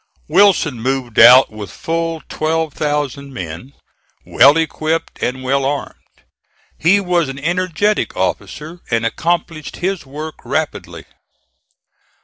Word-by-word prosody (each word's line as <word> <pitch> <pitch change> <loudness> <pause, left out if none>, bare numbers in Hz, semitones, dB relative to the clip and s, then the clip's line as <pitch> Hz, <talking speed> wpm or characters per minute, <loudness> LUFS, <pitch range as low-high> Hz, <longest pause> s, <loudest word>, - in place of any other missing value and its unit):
Wilson 165 - +3
moved 130 -2 -1
out 130 0 +8
with 105 -3 -8
full 165 -1 -3
12,000 150 -3 -2
men, 90 - -8 0.5
well 140 +5 +5
equipped 160 0 -2
and 130 +1 -2
well 135 +1 +1
armed. 140 +1 -2 0.9
He 180 +6 +4
was 175 -6 0
an 135 - -6
energetic 180 - -1
officer 150 - -3
and 115 -1 0
accomplished 165 +4 -2
his 190 0 -2
work 150 +3 -8
rapidly. 155 -2 -4
150 Hz, 110 wpm, -17 LUFS, 130-165 Hz, 0.9 s, out